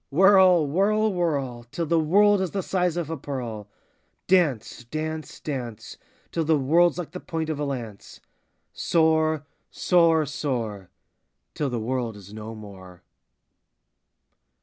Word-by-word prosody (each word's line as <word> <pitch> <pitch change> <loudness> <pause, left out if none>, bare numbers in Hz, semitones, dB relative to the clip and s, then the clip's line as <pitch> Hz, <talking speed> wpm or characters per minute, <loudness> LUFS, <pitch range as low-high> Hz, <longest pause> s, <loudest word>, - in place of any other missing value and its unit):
Whirl, 185 0 +5
whirl, 205 +7 +1
whirl, 140 -9 -2
Till 170 +6 -3
the 165 +1 +2
world 200 +5 +4
is 190 - -1
the 195 +1 -3
size 180 -2 0
of 165 -2 -3
a 165 - -3
pearl. 120 -7 -6 0.6
Dance, 155 - +1
dance, 155 +4 -5
dance, 125 -7 -6 0.4
Till 165 - -1
the 160 0 +3
world 165 +6 +3
's - - -12
like 175 -3 -5
the 180 - -7
point 160 -2 -3
of 150 - -4
a 150 - -1
lance. 120 -7 -7 0.5
Soar, 160 -2 +1 0.2
soar, 165 -3 +3
soar, 115 - -4 0.6
Till 145 - -2
the 120 -2 -2
world 120 -1 -2
is 100 0 -13
no 110 +1 -7
more. 95 -4 -12
155 Hz, 140 wpm, -25 LUFS, 120-175 Hz, 0.6 s, Whirl